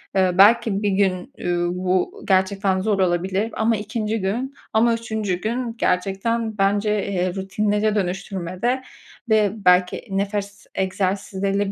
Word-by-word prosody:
Eee, 190 -1 +3
belki 210 0 +5
bir 205 - +2
gün, 190 -2 0
üüü, 175 0 -1
bu 185 - -1
gerçekten 190 0 +2
zor 205 -1 0
olabilir 190 +4 0
ama 225 +1 +2
2'nci 215 0 -3
gün 240 +8 -2 0.2
ama 230 +2 +4
3'üncü 220 -4 -2
gün 235 +1 -2
gerçekten 215 +4 0
bence, 200 +1 +2 0.2
eee, 185 -1 -1
rutinlere 210 +2 0
dönüştürmede 190 +4 -2 0.5
ve 215 -2 +4
belki 180 0 +3
nefes 200 +1 -3
egzersizleriyle 195 +1 -1
200 Hz, 125 wpm, -22 LUFS, 190-220 Hz, 0.5 s, belki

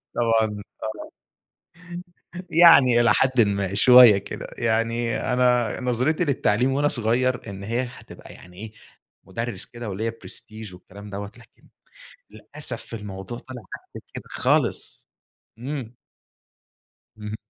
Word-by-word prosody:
طبعًا 110 -3 0 0.2
آه، 110 0 -7 1.4
يعني 155 -8 +7
إلى 120 - +5
حَدٍّ 130 -2 +3
ما، 100 -2 0
شوية 120 0 +8
كده، - - -7
يعني 115 +1 0 0.2
أنا 125 -2 +1
نظرتي 125 +7 0
للتعليم 130 -3 +1
وأنا 145 +2 +1
صغير 125 -1 0
إن 100 0 -8
هي 115 +4 -1
هتبقى 125 - -12
يعني 90 0 -16
إيه 110 +2 -9 0.5
مدرس 115 -4 -5
كده 120 -2 -8
وليّا 110 +4 -3
prestige 110 -3 -6
والكلام 100 +3 -13
دَوّة 100 0 -6
لكن - - -21 0.6
للأسف 120 +1 -6
الموضوع 105 +2 -7
طلع 125 -2 -10 0.3
غير - - -9
كده - - -7
خالص، - - -1 0.5
إمم. 125 -2 -6 1.2
اهم. 105 0 -6
115 Hz, 115 wpm, -23 LUFS, 105-125 Hz, 1.4 s, شوية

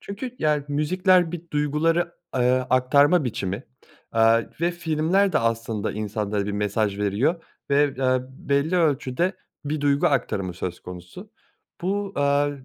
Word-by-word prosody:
Çünkü, 235 +5 -7
yani, 150 -2 +1
müzikler 175 +4 +2
bir 175 - -5
duyguları, 155 +4 0 0.2
eee, 125 0 +3 0.2
aktarma 140 +6 +4
biçimi. 105 -2 -3 0.5
Aaa, 115 0 +4 0.2
ve 170 +1 +2
filmler 175 +3 +1
de - - +3
aslında 115 -2 -1
insanlara 105 -1 -2
bir 105 - -2
mesaj 105 0 -1
veriyor 110 - 0 0.3
ve, 140 +1 +5
eee, 130 -1 +2
belli 140 +5 0
ölçüde 155 +1 +1 0.3
bir 150 +1 -2
duygu 145 +3 +2
aktarımı 115 - 0
söz 90 0 -5
konusu. 90 - -10 0.5
Bu, 200 +2 -2
eee, 140 -1 +1
140 Hz, 135 wpm, -24 LUFS, 115-165 Hz, 0.5 s, ve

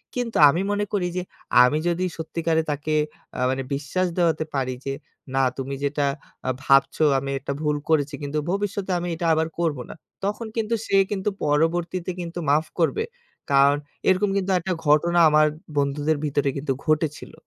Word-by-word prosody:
কিন্তু 245 -2 -2
আমি 165 +6 +1
মনে 205 0 0
করি, 185 -3 +1
যে - - 0 0.4
আমি 125 +4 +3
যদি 175 +1 0
সত্যিকারে 160 0 0
তাকে 150 +2 -2 0.4
আ - - -4
মানে 130 +1 -1
বিশ্বাস 150 +7 -1
দেওয়াতে 165 -3 +2
পারি, 130 -1 0
যে 135 - -1 0.4
না 135 - +3 0.2
তুমি 135 +1 -4
যেটা 145 0 0 0.4
আ - - +2
ভাবছো, 135 +3 +3 0.2
আমি 135 - -5
এটা 140 +1 -4
ভুল 150 -1 +1
করেছি, 150 -2 +2
কিন্তু 145 +1 -3
ভবিষ্যতে 200 -1 -2
আমি 175 - -4
এটা 170 - -4
আবার 160 0 +1
করব 165 -4 0
না। - - -6 0.3
তখন 210 +3 -2
কিন্তু 225 0 -1
সে 195 - +3
কিন্তু 200 0 0 0.2
পরবর্তীতে 170 +4 0
কিন্তু 175 0 -5
মাফ 150 +2 +3
করবে। 170 - +2 0.5
কারণ 140 +1 +5 0.3
এরকম 190 +2 +3
কিন্তু 195 0 0
একটা 185 +2 -2
ঘটনা 170 +4 +4
আমার 155 0 +5 0.3
বন্ধুদের 145 +2 +1
ভিতরে 145 -1 +1
কিন্তু 140 0 -1
ঘটেছিল। 155 -1 -1
160 Hz, 170 wpm, -24 LUFS, 145-180 Hz, 0.5 s, কারণ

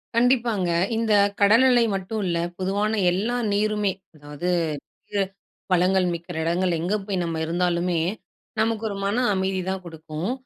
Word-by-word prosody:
கண்டிப்பாங்க. 235 -6 +2 0.3
இந்த 225 -1 +1 0.3
கடல்நிலை 240 +4 +6
மட்டும் 195 +3 -3
இல்ல, 170 -1 0 0.2
பொதுவான 205 +3 0
எல்லா 210 +7 -1 0.2
நீருமே, 210 -1 +1 0.2
அதாவது 145 +3 -5 0.6
வு 200 - +2 0.5
வளங்கள் 185 +1 +3
மிக்கிற 170 +1 -7
இடங்கள் 175 +2 +1
எங்கே 180 +6 0
போய் 195 -3 -1
நம்ப 165 -1 -3
இருந்தாலுமே, 175 0 0 0.6
நமக்கு 225 0 0
ஒரு 200 - -4
மன 205 +5 +1
அமைதி 190 0 0
தான் 190 -1 -3
குடுக்கும். 160 +3 -5
190 Hz, 130 wpm, -24 LUFS, 175-215 Hz, 0.6 s, கடல்நிலை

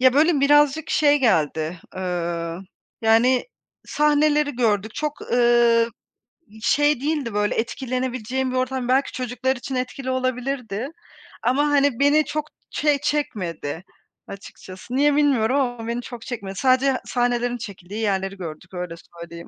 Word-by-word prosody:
Ya, 260 0 +6
böyle, 300 +1 +3
birazcık 295 +2 +4
şey 290 -1 +4
geldi, 165 - +1 0.2
eee, 170 -2 -3 0.4
yani, 235 +3 +4 0.4
sahneleri 300 0 +2
gördük, 220 -3 0
çok, 300 -1 -3
ııı, 235 -1 +3 0.7
şey 290 +2 +2
değildi, 290 -6 -1
böyle, 210 0 0
etkilenebileceğim 255 +1 -2
bir 255 - -3
ortam. 255 -1 -1
Belki 265 +2 +2
çocuklar 255 +1 -2
için 260 +2 -6
etkili 255 +1 -3
olabilirdi 255 -2 -2 0.6
ama, 275 +4 +2
hani, 285 -3 +2
beni 290 +2 +4
çok 300 +2 -3 0.2
şey 295 -2 +1
çekmedi 185 - -3 0.4
açıkçası. 195 +3 -9
Niye 285 +1 +3
bilmiyorum 270 -4 +2
ama 245 -3 -2
beni 235 +1 -2
çok 240 -1 -9
çekmedi. 200 -7 -6
Sadece 260 +3 +3
sahnelerin 245 0 0
çekildiği 200 -2 -8
yerleri 195 -2 -1
gördük, 170 0 -8
öyle 180 -2 -5
söyleyeyim. 170 +1 -11
245 Hz, 130 wpm, -23 LUFS, 205-275 Hz, 0.7 s, Ya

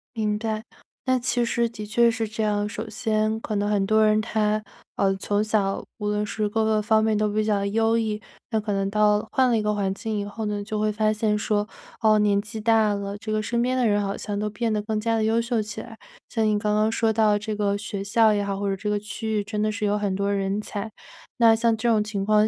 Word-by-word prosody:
明 210 -1 0
白， 220 -1 -3 0.4
那 255 0 +3
其 245 -1 0
实 235 0 +1
的 215 -2 -8
确 235 +2 +4
是 225 -1 -2
这 215 +1 -3
样。 210 0 0
首 220 +1 -5
先 215 +1 0
可 215 - -3
能 205 0 0
很 205 -2 +1
多 215 +2 +3
人 215 0 +3
他， 215 -1 0 0.3
呃， 195 -1 +2
从 205 +2 0
小， 205 -2 0
无 210 - -3
论 210 0 0
是 210 0 -2
各 220 +2 0
个 220 -1 +2
方 220 +1 +3
面 220 -1 +2
都 215 0 +2
比 215 0 +1
较 205 -2 +1
优 225 +2 +2
异。 215 -2 -1 0.3
那 220 - +2
可 210 0 -3
能 195 0 0
到 210 0 +4
了 210 - -4
换 260 -1 +3
了 235 - +3
一 215 - -1
个 210 0 +1
环 200 -2 0
境 215 0 -3
以 - - -2
后 210 +2 -5
呢， 205 -1 -2
就 215 +1 -3
会 215 0 +1
发 215 0 +1
现 215 0 +1
说： 210 0 0 0.3
“哦， 215 -1 +5
年 205 -1 +3
纪 215 +1 -6
大 220 -1 +3
了， 200 0 -4
这 215 +1 -6
个 215 - +1
身 235 +2 0
边 255 +1 0
的 250 -3 +2
人 205 0 +2
好 200 0 -2
像 205 -1 -4
都 210 - -1
变 225 +2 -1
得 215 - +1
更 215 0 -2
加 230 +1 +1
地 220 - +1
优 225 +1 +2
秀 235 -1 -1
起 210 0 -4
来。” 225 -2 -11 0.3
像 225 -2 0
你 210 -1 +2
刚 210 0 0
刚 215 +1 +2
说 225 0 +1
到 215 -1 +3
这 215 0 -4
个 205 -1 0
学 205 -1 -4
校 220 +2 +4
也 205 -1 +1
好， 200 0 -3
或 200 - -1
者 195 - 0
这 205 +2 -6
个 205 - 0
区 220 +2 -5
域 205 - -2
真 210 +1 -4
的 215 - +1
是 215 0 -5
有 205 0 +1
很 205 -2 -1
多 200 +1 0
人 195 +1 -1
才。 210 +1 -5 0.5
那 230 -2 +6
像 230 0 +2
这 230 +2 0
种 220 -2 +3
情 210 -2 -3
况 210 +1 +4
215 Hz, 285 characters per minute, -24 LUFS, 205-220 Hz, 0.5 s, 那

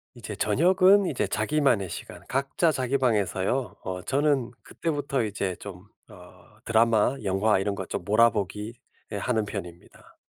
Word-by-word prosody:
이제 110 -3 -7
저녁은 185 - +4
이제 135 - -1
자기만의 110 - +1
시간. - - -8
각자 140 +5 +1
자기 130 -1 0
방에서요. 110 0 0
어 90 -1 -4
저는 140 -3 +1
그때부터 145 -6 -2
이제 100 -3 -3
좀 100 0 -10 0.2
어 90 +3 -17
드라마, 115 +2 +3
영화 100 +2 +2
이런 100 +1 -1
거 95 -1 -5
좀 85 - -5
몰아보기 105 0 +1 0.4
예 105 - -2
하는 110 0 0
편입니다. 90 -4 -10
110 Hz, 305 characters per minute, -26 LUFS, 100-135 Hz, 0.4 s, 저녁은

